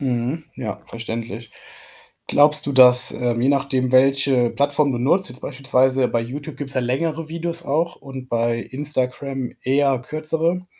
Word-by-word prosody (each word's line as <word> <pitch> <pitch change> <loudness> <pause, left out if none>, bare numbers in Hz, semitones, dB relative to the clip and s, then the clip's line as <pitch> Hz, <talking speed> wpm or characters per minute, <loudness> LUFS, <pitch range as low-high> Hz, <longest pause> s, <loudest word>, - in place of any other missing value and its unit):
Mhm. 130 +4 -2
Ja, 110 -5 -6
verständlich. 115 -1 -7 0.7
Glaubst 150 +1 +4
du, 140 - -1
dass, 125 -1 +7
ähm, 120 -1 -1
je 130 - +2
nachdem 135 -2 0
welche 135 -2 +3
Plattform 145 0 +1
du 120 - -3
nutzt, 145 +9 +1
jetzt 125 +1 -12
beispielsweise 130 -1 +1
bei 115 - 0
Youtube 140 +6 -7
gibt's 140 -2 -6
ja 130 - +1
längere 155 +6 -2
Videos 170 +1 -4
auch 165 +4 -1
und 135 -2 -10
bei 115 0 0
Instagram 135 -1 -3
eher 135 0 +2
kürzere, 160 +6 -2
135 Hz, 150 wpm, -21 LUFS, 125-145 Hz, 0.7 s, dass